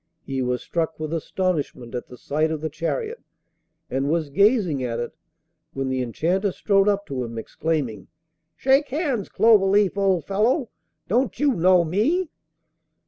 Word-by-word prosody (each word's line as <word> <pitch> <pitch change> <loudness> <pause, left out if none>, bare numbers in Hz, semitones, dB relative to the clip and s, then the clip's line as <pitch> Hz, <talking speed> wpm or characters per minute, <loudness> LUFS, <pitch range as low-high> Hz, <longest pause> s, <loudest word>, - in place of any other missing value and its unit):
He 135 -1 -2
was 125 0 -1
struck 160 -2 -2
with 155 0 -4
astonishment 160 -7 -2
at 120 - -4
the 125 - -12
sight 155 +5 0
of 155 -1 -3
the 155 -1 -3
chariot, 430 - -3 0.7
and 135 +2 -1
was 160 -2 0
gazing 200 - +3
at 120 -1 -2
it, 120 - -3 0.6
when 135 -1 -2
the 130 0 -1
Enchanter 175 - 0
strode 195 +1 +2
up 200 0 +1
to 130 -8 -3
him, 115 -1 -7
exclaiming: 140 -2 -3 0.5
'Shake 275 +2 +3
hands, 270 - -1
Cloverleaf, 200 -2 +4
old 190 -4 +2
fellow! 225 +7 +1 0.4
Don't 250 +6 0
you 285 -1 +3
know 180 -2 +4
me? 275 - 0
175 Hz, 150 wpm, -23 LUFS, 140-210 Hz, 0.7 s, Cloverleaf